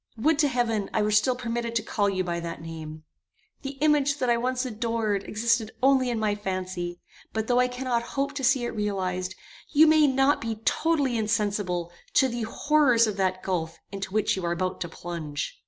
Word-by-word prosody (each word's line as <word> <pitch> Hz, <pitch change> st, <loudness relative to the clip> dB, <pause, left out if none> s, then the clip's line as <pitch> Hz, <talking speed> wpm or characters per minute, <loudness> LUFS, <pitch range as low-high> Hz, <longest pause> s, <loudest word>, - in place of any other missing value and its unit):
would 290 Hz, +6 st, +2 dB
to 300 Hz, -, +5 dB
heaven 235 Hz, -6 st, 0 dB
I 215 Hz, -, +3 dB
were 210 Hz, -, +1 dB
still 215 Hz, +5 st, +3 dB
permitted 235 Hz, -1 st, -3 dB
to 225 Hz, -, +1 dB
call 205 Hz, -2 st, 0 dB
you 185 Hz, -1 st, -1 dB
by 170 Hz, -1 st, -2 dB
that 170 Hz, 0 st, -5 dB
name. 160 Hz, -1 st, -8 dB, 0.6 s
The 275 Hz, 0 st, -6 dB
image 290 Hz, -2 st, +3 dB
that 255 Hz, -4 st, +1 dB
I -, -, +4 dB
once 255 Hz, +2 st, -1 dB
adored 225 Hz, -3 st, -1 dB
existed 230 Hz, 0 st, 0 dB
only 265 Hz, -2 st, +4 dB
in 235 Hz, -, -1 dB
my 215 Hz, -1 st, +1 dB
fancy; 185 Hz, -3 st, -4 dB, 0.3 s
but 220 Hz, 0 st, -1 dB
though 245 Hz, +1 st, +2 dB
I 250 Hz, -, +4 dB
cannot 250 Hz, -1 st, -1 dB, 0.2 s
hope 280 Hz, +1 st, 0 dB
to 285 Hz, -2 st, -5 dB
see 255 Hz, -1 st, +3 dB
it -, -, -2 dB
realized, 185 Hz, -3 st, -2 dB, 0.3 s
you 310 Hz, +1 st, +6 dB
may 310 Hz, -1 st, +5 dB
not 270 Hz, +1 st, +3 dB
be 225 Hz, -1 st, -2 dB
totally 290 Hz, -7 st, +1 dB
insensible 205 Hz, -5 st, -1 dB, 0.2 s
to 265 Hz, -, +5 dB
the 240 Hz, -1 st, -4 dB
horrors 280 Hz, -6 st, +4 dB
of 215 Hz, -2 st, -2 dB
that 185 Hz, -1 st, 0 dB
gulf 165 Hz, -3 st, -2 dB
into 195 Hz, -1 st, -5 dB
which 215 Hz, +1 st, +1 dB
you 190 Hz, -, -5 dB
are 170 Hz, -, 0 dB
about 185 Hz, +2 st, -3 dB
to 170 Hz, -, -3 dB
plunge. 165 Hz, -4 st, -5 dB
220 Hz, 200 wpm, -26 LUFS, 185-255 Hz, 0.6 s, you